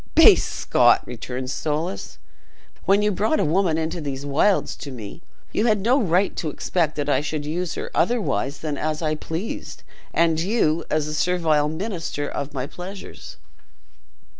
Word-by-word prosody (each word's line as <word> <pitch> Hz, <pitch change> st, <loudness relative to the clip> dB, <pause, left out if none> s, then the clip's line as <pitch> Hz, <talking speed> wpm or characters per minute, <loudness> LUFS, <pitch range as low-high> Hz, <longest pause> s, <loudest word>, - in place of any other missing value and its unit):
"Base -, -, +8 dB
Scot!" -, -, +3 dB
returned 125 Hz, +2 st, -5 dB
Soulis, 160 Hz, +6 st, -3 dB, 0.7 s
"when 200 Hz, +2 st, +4 dB
you 210 Hz, -, +3 dB
brought 215 Hz, -, +1 dB
a -, -, +2 dB
woman 165 Hz, +1 st, +2 dB
into 165 Hz, +1 st, -2 dB
these 140 Hz, -1 st, -4 dB
wilds 155 Hz, +8 st, +2 dB
to 145 Hz, -, -7 dB
me, 120 Hz, +4 st, -8 dB, 0.3 s
you 220 Hz, -, +1 dB
had 210 Hz, -3 st, +3 dB
no 250 Hz, +7 st, +3 dB
right 185 Hz, 0 st, +2 dB
to 155 Hz, -, -1 dB
expect 155 Hz, +1 st, -1 dB
that 145 Hz, -1 st, -2 dB
I 145 Hz, -, +2 dB
should 150 Hz, 0 st, -3 dB
use 170 Hz, +3 st, -2 dB
her -, -, -5 dB
otherwise 160 Hz, -, 0 dB
than 150 Hz, -3 st, -3 dB
as 155 Hz, +1 st, -2 dB
I 155 Hz, -1 st, +1 dB
pleased, 160 Hz, +6 st, -5 dB, 0.3 s
and 165 Hz, -1 st, +2 dB
you, 170 Hz, -4 st, +1 dB
as 155 Hz, -1 st, +1 dB
the 155 Hz, -, -4 dB
servile 155 Hz, -3 st, +2 dB
minister 165 Hz, -4 st, -3 dB
of 140 Hz, 0 st, -4 dB
my 130 Hz, -2 st, -3 dB
pleasures." 185 Hz, +6 st, -9 dB
160 Hz, 165 wpm, -23 LUFS, 145-185 Hz, 0.7 s, Base